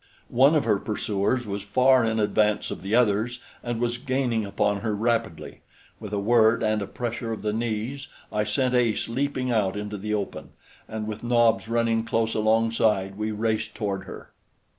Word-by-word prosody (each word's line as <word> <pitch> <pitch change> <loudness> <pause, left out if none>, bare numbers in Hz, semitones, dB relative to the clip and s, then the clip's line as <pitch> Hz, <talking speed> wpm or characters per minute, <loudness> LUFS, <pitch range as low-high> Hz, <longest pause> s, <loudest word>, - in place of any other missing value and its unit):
One 135 +6 +5
of 150 - +3
her 105 -3 +2
pursuers 110 +3 -1
was 100 -1 -4
far 130 +6 +4
in 110 -1 0
advance 105 0 +1
of - - -6
the 100 +4 -1
others, 120 +1 +2 0.2
and 120 -1 -3
was 120 0 -1
gaining 130 -4 0
upon 100 +1 0
her 110 -1 -2
rapidly. 115 -4 -2 0.4
With 105 -2 -8
a 105 - -1
word 110 +2 +3
and 110 -1 +1
a 100 - -4
pressure 115 0 -4
of 110 - -5
the 105 -1 0
knees 120 +4 -3 0.2
I 105 0 0
sent 125 +5 0
Ace 120 -3 +1
leaping 130 +1 -1
out 105 -4 +1
into 105 0 -5
the 105 +2 -2
open, 100 -2 -5 0.3
and 110 0 -5
with 110 +1 -6
Nobs 120 -2 +3
running 115 -1 +1
close 115 0 0
alongside, 110 -3 +1
we 105 +1 -2
raced 110 +1 -2
toward 100 -3 -3
her. - - -10
110 Hz, 180 wpm, -25 LUFS, 105-120 Hz, 0.4 s, One